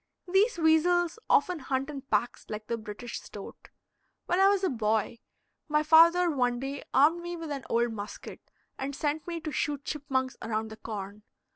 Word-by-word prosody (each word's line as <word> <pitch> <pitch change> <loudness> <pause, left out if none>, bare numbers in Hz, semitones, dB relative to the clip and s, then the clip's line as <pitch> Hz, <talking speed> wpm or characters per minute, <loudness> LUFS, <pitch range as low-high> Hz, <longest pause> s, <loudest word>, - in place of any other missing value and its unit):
These 390 +5 +3
weasels 340 +4 +3
often 360 -3 +3
hunt 265 0 -2
in 280 -2 -6
packs 245 -2 -1
like 215 0 -5
the 235 - -2
British 230 +1 -7
stoat. - - -11 0.6
When 355 - +1
I 390 - +7
was 400 -1 +2
a 375 - +3
boy, 220 0 0 0.5
my 300 0 +2
father 335 +3 +6
one 250 -6 +1
day 275 +2 -4
armed 320 +5 +4
me 345 0 -5
with 325 -3 -6
an 275 -2 -4
old 235 0 +1
musket 205 0 -8 0.3
and 275 +1 -3
sent 300 +3 -2
me 340 -1 -3
to 310 -1 -4
shoot 285 0 -2
chipmunks 265 -3 -2
around 220 0 -2
the 220 - -9
corn. 210 -2 -7
280 Hz, 175 wpm, -29 LUFS, 235-335 Hz, 0.6 s, I